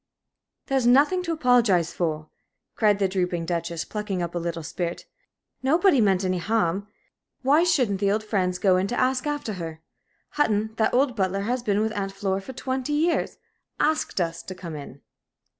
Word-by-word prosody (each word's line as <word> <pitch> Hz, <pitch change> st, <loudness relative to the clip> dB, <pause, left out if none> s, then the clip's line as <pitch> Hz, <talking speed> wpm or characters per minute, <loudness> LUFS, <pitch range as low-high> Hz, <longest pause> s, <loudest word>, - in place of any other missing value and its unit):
"There's 265 Hz, -3 st, +1 dB
nothing 290 Hz, +9 st, +4 dB
to 350 Hz, -2 st, -3 dB
apologize 240 Hz, -, +3 dB
for," 155 Hz, -3 st, -3 dB, 0.4 s
cried 210 Hz, -2 st, +3 dB
the 195 Hz, -1 st, +2 dB
drooping 180 Hz, -3 st, -1 dB
Duchess, 170 Hz, -1 st, -3 dB
plucking 210 Hz, -4 st, -3 dB
up 170 Hz, -, -4 dB
a 175 Hz, -, -1 dB
little 170 Hz, -1 st, -4 dB
spirit. 170 Hz, +3 st, -4 dB, 0.6 s
"Nobody 305 Hz, +1 st, +4 dB
meant 195 Hz, -2 st, +2 dB
any 185 Hz, -1 st, 0 dB
harm. 200 Hz, -1 st, 0 dB, 0.6 s
Why 290 Hz, +5 st, +4 dB
shouldn't 255 Hz, -, +2 dB
the 200 Hz, 0 st, +2 dB
old 215 Hz, +1 st, 0 dB
friends 185 Hz, -4 st, 0 dB
go 185 Hz, -1 st, +3 dB
in 185 Hz, +1 st, 0 dB
to 240 Hz, -, -2 dB
ask 255 Hz, +2 st, +1 dB
after 290 Hz, -7 st, -2 dB
her? 160 Hz, -1 st, -6 dB, 0.5 s
Hutton 220 Hz, -6 st, 0 dB
that 220 Hz, +1 st, +2 dB
old 260 Hz, -1 st, +2 dB
butler 195 Hz, -1 st, 0 dB
that -, -, -4 dB
has 250 Hz, +2 st, -1 dB
been 210 Hz, -3 st, +1 dB
with 220 Hz, 0 st, -1 dB
Aunt 195 Hz, -1 st, -3 dB
Flora 195 Hz, -1 st, -2 dB
for 260 Hz, +7 st, -9 dB
twenty 260 Hz, +2 st, -3 dB
years 325 Hz, +3 st, 0 dB, 0.4 s
asked 310 Hz, -8 st, 0 dB
us 165 Hz, -2 st, -1 dB
to 185 Hz, -, -8 dB
come 170 Hz, -3 st, -7 dB
in." 140 Hz, -2 st, -9 dB
205 Hz, 180 wpm, -25 LUFS, 180-255 Hz, 0.6 s, nothing